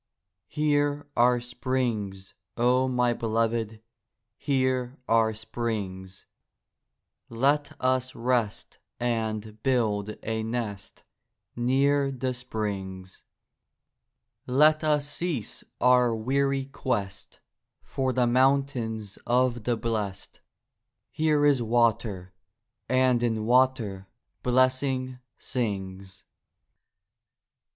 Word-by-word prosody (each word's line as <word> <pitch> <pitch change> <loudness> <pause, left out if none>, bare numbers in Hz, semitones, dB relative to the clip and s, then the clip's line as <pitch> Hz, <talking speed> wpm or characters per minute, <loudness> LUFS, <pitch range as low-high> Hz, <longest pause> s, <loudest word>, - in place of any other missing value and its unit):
Here 145 -1 0
are 125 +1 +4
springs, 120 -6 -3 0.2
O 125 +2 +3
my 125 -1 +2
beloved. 115 -1 -1 0.5
Here 130 -1 0
are 115 -1 +3
springs; 105 -5 -5 1.0
Let 140 +5 0
us 130 0 0
rest 120 -3 -1 0.2
and 110 -2 -2
build 110 -5 0
a 110 0 -2
nest 110 -3 -5 0.5
Near 135 +3 +2
the 130 -1 -2
springs; 100 -6 -5 1.2
Let 150 +5 +4
us 150 -2 +1
cease 145 - -4 0.2
our 125 -2 +4
weary 135 +4 0
quest 100 -7 -4 0.4
For 130 -1 -1
the 125 -1 +2
mountains 120 -5 +1
of 120 -2 +1
the 120 -2 +1
blest; 110 -4 -4 0.7
Here 155 -2 +2
is 140 -4 +4
water, 110 -5 0 0.6
and 130 -2 +3
in 110 -3 0
water 120 -6 +2 0.3
Blessing 130 0 +1 0.2
sings. 95 -5 -4
120 Hz, 85 wpm, -27 LUFS, 110-130 Hz, 1.2 s, are